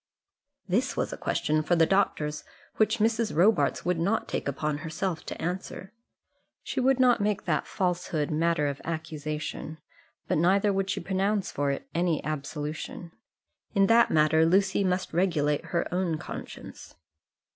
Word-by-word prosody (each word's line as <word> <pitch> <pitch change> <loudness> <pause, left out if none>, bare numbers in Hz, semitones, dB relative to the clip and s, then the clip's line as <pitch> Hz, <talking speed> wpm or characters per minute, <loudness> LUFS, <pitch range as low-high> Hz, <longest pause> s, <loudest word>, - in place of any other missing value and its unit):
This - - 0
was - - -1
a - - -3
question 155 0 0
for 165 +3 +1
the 165 -1 +5
doctors 150 -5 0 0.3
which 220 +1 +3
Mrs. 225 -1 +1
Robarts 200 +7 +3
would 180 -2 +1
not 200 +7 0
take - - -3
upon 145 +2 -2
herself 165 +2 -3
to - - -6
answer. 190 +3 -5 0.7
She - - -3
would 260 0 +3
not 250 -4 +4
make 205 -1 0
that 155 -4 0
falsehood 175 -5 -1
matter 165 0 +1
of 140 -1 -3
accusation, 155 -1 -5 0.5
but - - +1
neither 195 +4 +3
would 195 0 -1
she - - -1
pronounce 195 +1 0
for 145 0 -1
it 140 - -3
any 170 -2 0
absolution. 155 +3 -5 0.6
In 195 -1 +5
that 230 +3 +5
matter 155 +1 +4
Lucy 190 +4 +3
must 185 -2 -1
regulate 155 -5 +1
her 170 - -1
own 180 -3 0
conscience. - - -9
170 Hz, 150 wpm, -27 LUFS, 155-195 Hz, 0.7 s, the